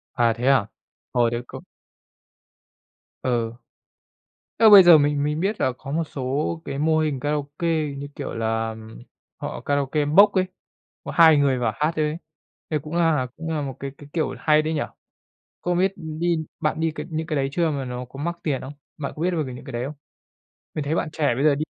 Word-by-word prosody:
À, 120 -2 +3
thế 125 - -1
à? 135 -7 +4 0.5
Hồi 120 -2 +3
đấy 120 0 -2
c - - -10 1.6
Ừ. 120 -3 0 1.1
Thế 225 - +6
mà - - +9
bây 200 -2 +11
giờ 175 -3 +8
mình 145 0 +1
mình 150 +1 -1
biết 200 +4 -1
là 130 - +2
có 135 - -8
một 165 +3 0
số 145 +3 -2
cái 140 - -5
mô 155 +2 +2
hình 150 -4 0
karaoke, 145 +4 -2 0.3
như 140 +1 -6
kiểu - - -5
là, 115 0 -1 0.6
họ - - -5
karaoke 145 +1 0
box 200 +8 +6
ấy, 185 -1 +3 0.6
có - - -5
hai 160 -2 +7
người 140 -3 +2
vào 120 -3 0
hát 155 +2 +1
thôi 155 - +2
ấy, 150 +1 -1 0.5
thế 155 - +1
cũng 150 +3 -8
là 160 -6 +2
cũng 160 0 -6
là 155 -2 -1
một 135 -3 -5
cái 140 - -4
cái, 145 - -13
kiểu, 160 -2 -1
hay 155 0 +3
đấy 160 +1 -2
nhỉ? 145 - 0 0.8
Không 175 0 0
biết 190 +2 +3
đi 165 0 -1 0.2
bạn 155 -1 -1
đi 160 0 +1
cái - - -5
những 160 0 -3
cái 155 - -2
đấy 135 -1 0
chưa, 170 +2 +1
mà 140 -2 -3
nó 125 0 -5
có 135 +2 -12
mắc 170 0 -2
tiền 140 -5 -1
không? 140 +2 -8 0.2
Bạn 145 -3 -4
có 155 - -7
biết 180 +2 +2
về 165 -3 0
về 130 -3 -6
những 125 - -10
cái 130 - -8
đấy 120 +1 -2
không? 150 +3 -6 0.8
Mình 155 - -2
thấy 145 +3 -1
bạn 165 - 0
trẻ 145 -6 +1
bây 140 - 0
giờ 150 -2 +5
đi 150 +2 -2
150 Hz, 220 wpm, -23 LUFS, 135-160 Hz, 1.6 s, bây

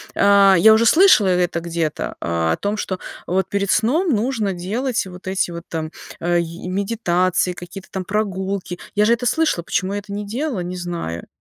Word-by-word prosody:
а, 200 -1 +6
я 220 +5 +7
уже 225 +1 +3
слышала 345 - +6
это 180 -2 +1
где-то, 165 -2 -3
а, 85 -1 0
о - - -3
том, 205 +1 -2
что 190 -2 -3 0.3
вот 190 +1 0
перед 200 -1 -1
сном 300 - +2
нужно 225 -4 0
делать 220 +8 -2
вот 185 0 -11
эти 190 -2 0
вот 170 0 -7
там, 160 -1 -4 0.3
а, 175 +1 +1
и 170 +1 -5
медитации, 185 -2 0
какие-то 175 +2 -10
там 190 - -3
прогулки. 190 -2 -3 0.2
Я 210 - +4
же 230 - +4
это 235 +1 -1
слышала, 310 - +1
почему 185 +3 -1
я 205 - -1
это 200 0 -12
не 205 +1 -4
делала, 240 - -3
не 180 +1 -5
знаю. 170 - -5
190 Hz, 190 wpm, -20 LUFS, 175-210 Hz, 0.3 s, я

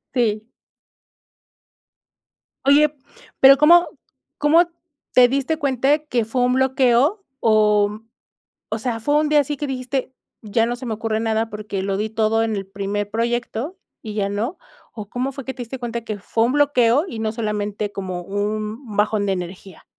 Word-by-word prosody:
Sí. 220 -2 0 2.2
Oye, 295 +2 +5 0.5
pero, 270 +1 +9
¿cómo 340 +4 +6 0.5
cómo 305 +4 +5 0.5
te 250 -1 +7
diste 275 +4 0
cuenta 275 +1 +2
que 250 -7 -1
fue 245 +3 -1
un 250 +1 +2
bloqueo? 265 - +2 0.2
Oh, 210 -2 +4
mm, 215 +2 -11 0.6
o 220 - -2
sea, 230 -1 -3
fue 290 +6 +1
un 305 - 0
día 300 -1 +5
así 290 +1 -2
que 295 - -2
dijiste: 260 0 -3 0.3
"Ya 225 +1 0
no 240 +1 -2
se 255 - -8
me 220 - -2
ocurre 220 0 -2
nada, 225 0 -1
porque, 210 -2 -5
lo 195 0 -1
di 215 +1 -1
todo 225 0 +1
en 220 -2 -1
el 195 -1 -4
primer 200 +1 -3
proyecto, 240 - -2 0.3
y 215 -2 -7
ya", 200 -2 -1
¿no? 225 - -2 0.4
O, 210 -2 -8
¿cómo 255 +2 -2
fue 275 -1 -8
que 265 - -4
te 260 - -13
diste 250 +3 -7
cuenta, 235 -1 -4
que 215 -2 -5
fue 225 +3 0
un 245 - +1
bloqueo, 285 -1 +3
y 230 - -7
no 220 -1 -1
solamente 210 -2 -3
como 185 -2 -5
un 210 +4 -4
bajón 210 0 +1
de 195 - +1
energía? 180 0 -7
230 Hz, 175 wpm, -21 LUFS, 210-265 Hz, 2.2 s, pero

